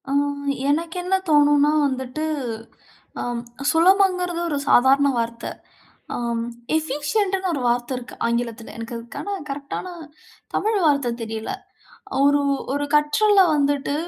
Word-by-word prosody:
அ - - -3 0.6
எனக்கு 325 +3 0
என்ன 365 +2 +1
தோணும்னா 295 -1 +5 0.2
வந்துட்டு, 260 +2 -4 1.0
அம் 240 -1 -3 0.3
சுலபம்ங்கிறது 360 0 +3
ஒரு 290 - -1
சாதாரண 270 +3 +5
வார்த்த. 230 0 -3 0.7
அம் 235 -1 -2 0.4
எஃபிஷியன்ட்ன்னு 370 +6 -1
ஒரு 280 - -2
வார்த்த 240 +2 0
இருக்கு 250 0 -9
ஆங்கிலத்துல. 235 -1 -3
எனக்கு 230 +1 -6
அதுக்கான 235 - -6
கரெக்ட்டான 280 +5 -5 0.7
தமிழ் 430 -1 +1
வார்த்த 280 -5 +2
தெரியல. 220 -1 -4 0.7
ஒரு 285 0 +4 0.3
ஒரு 290 +1 -1
கற்றல 390 +8 +4
வந்துட்டு 285 -1 +1
285 Hz, 110 wpm, -22 LUFS, 240-330 Hz, 1.0 s, தோணும்னா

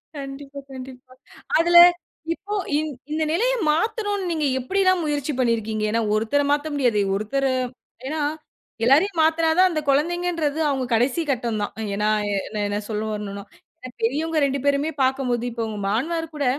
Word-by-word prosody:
கண்டிப்பா, 280 0 -8
கண்டிப்பா. 255 0 -10 0.5
அதுல 345 +1 +5 0.6
இப்போ 410 +4 -6 0.2
இந் 310 0 -2 0.2
இந்த 315 +1 0
நிலைய 475 +10 +2 0.2
மாத்தணுன்னு 410 +2 -1
நீங்க 310 -3 0
எப்பிடில்லாம் 370 +5 +2
முயற்சி 295 -1 -1
பண்ணியிருக்கீங்க? 220 -3 0
ஏன்னா 230 +1 +1
ஒருத்தர 225 +7 +1
மாத்த 290 +1 +1
முடியாது. 245 -7 +2 0.2
ஒருத்தர 215 +7 -1 0.6
ஏன்னா 310 +1 -2 0.6
எல்லாரையும் 320 +7 +4
மாத்துனாதான் 325 +3 +3
அந்த 310 - -1
கொழந்தைங்கன்றது 320 +1 0
அவுங்க 265 -2 -1
கடைசி 250 +8 +2
கட்டம் 235 -4 -2
தான். - - -4 0.2
ஏன்னா 210 +1 +1 0.2
எ - - 0 0.3
என்ன 205 0 -2
சொல்ல 215 -1 -2
வரணுன்னா, 200 -1 -5 0.4
அ - - -6
பெரியவங்க 310 +7 0
2 275 0 -1
பேருமே 285 +2 +2
பாக்கும்போது 260 -2 0
இப்ப 230 0 -3
உங்க 215 -1 -5
மாமனாருகூட, 310 +5 -2
280 Hz, 140 wpm, -23 LUFS, 240-325 Hz, 0.6 s, அதுல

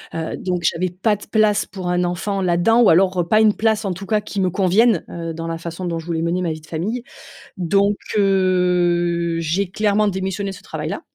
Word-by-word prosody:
heu, 160 -1 -3
donc 180 -2 -3
j'avais 180 +3 0
pas 200 +4 0
de 205 - -12
place 215 -1 +2
pour 185 -2 -7
un 180 0 +1
enfant 190 +3 -2
là-dedans 185 +7 +3
ou 230 - +6
alors, 185 +2 +3
heu, 170 - -4
pas 215 +3 +4
une 215 -1 +5
place, 220 -1 +1
en 190 - -1
tout 195 +2 -9
cas, 215 -1 +1
qui 205 -1 -4
me 185 - +2
convienne, 195 +2 +3
heu, 165 -1 -5
dans 165 0 -5
la 165 0 -4
façon 170 +2 -6
dont 165 -1 -2
je 160 - -10
voulais 165 -1 -2
mener 175 +2 0
ma 170 -3 -1
vie 155 0 -6
de - - -16
famille. 215 +10 -3 0.5
Donc, 200 +3 +2 0.2
heu, 175 -3 +2
j'ai 175 +4 -1
clairement 210 0 +1
démissionné 190 +1 -2
de - - -9
ce - - -13
travail-là. - - -5
185 Hz, 225 wpm, -20 LUFS, 170-205 Hz, 0.5 s, ou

